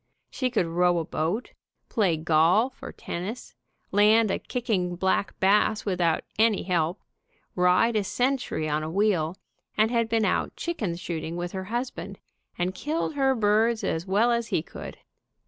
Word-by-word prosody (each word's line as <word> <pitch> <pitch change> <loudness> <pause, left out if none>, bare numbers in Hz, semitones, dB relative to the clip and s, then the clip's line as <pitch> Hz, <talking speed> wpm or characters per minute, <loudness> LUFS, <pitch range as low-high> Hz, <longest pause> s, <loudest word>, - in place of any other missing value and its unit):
She 255 -2 -1
could 225 -7 +1
row 175 +1 +2
a 165 - -1
boat, 170 +12 -2 0.4
play 190 -8 +1
golf 170 +10 +2
or - - -7
tennis, 200 +8 -6 0.4
land 210 +1 +4
a - - -1
kicking 210 -8 -2
black 190 +2 0
bass 210 +2 +3
without 175 -5 +1 0.2
any 220 -2 +3
help, 175 0 0 0.6
ride 180 +6 +3
a 210 - +2
century 245 - -1
on 150 0 0
a 155 - -4
wheel, 185 -3 +1 0.4
and 215 +2 +3
had 230 -2 +1
been 225 -1 +2
out - - 0
chicken 220 - -3
shooting 170 -2 -5
with 175 0 -4
her 190 -1 -5
husband, 205 -4 -4 0.4
and 180 +1 -1
killed 310 - -2
her 270 -2 +2
birds 220 +1 +2
as 165 -1 -2
well 215 +6 +3
as 235 -1 0
he - - 0
could. - - -9
200 Hz, 160 wpm, -26 LUFS, 175-230 Hz, 0.6 s, land